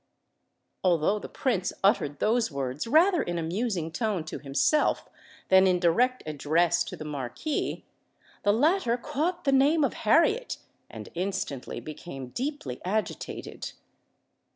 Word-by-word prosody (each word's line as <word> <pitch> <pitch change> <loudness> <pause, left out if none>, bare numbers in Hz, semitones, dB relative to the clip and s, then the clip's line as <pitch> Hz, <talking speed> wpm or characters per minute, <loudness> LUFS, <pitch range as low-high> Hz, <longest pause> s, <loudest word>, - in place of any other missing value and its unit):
Although 180 +3 +2
the - - -8
Prince 205 -9 -1
uttered 145 -7 +2
those 225 - +2
words 140 - -3
rather 335 +7 +5
in 175 0 -2
a 165 - -2
musing 175 -1 -2
tone 200 -1 -1
to 160 - -6
himself 145 - +1 0.4
than 190 0 +6
in 180 -1 +3
direct 245 +9 +2
address 160 +3 +2
to - - -6
the 155 - -7
Marquis, 145 - -3 0.6
the 205 - +3
latter 260 - +2
caught 300 +7 -2
the 275 - +2
name 285 +4 +4
of 275 - +1
Harriet, 335 - +2 0.3
and - - -9
instantly 175 -7 -3
became 140 -4 -8
deeply 250 - -4
agitated. 210 +4 -4
195 Hz, 130 wpm, -27 LUFS, 160-265 Hz, 0.6 s, than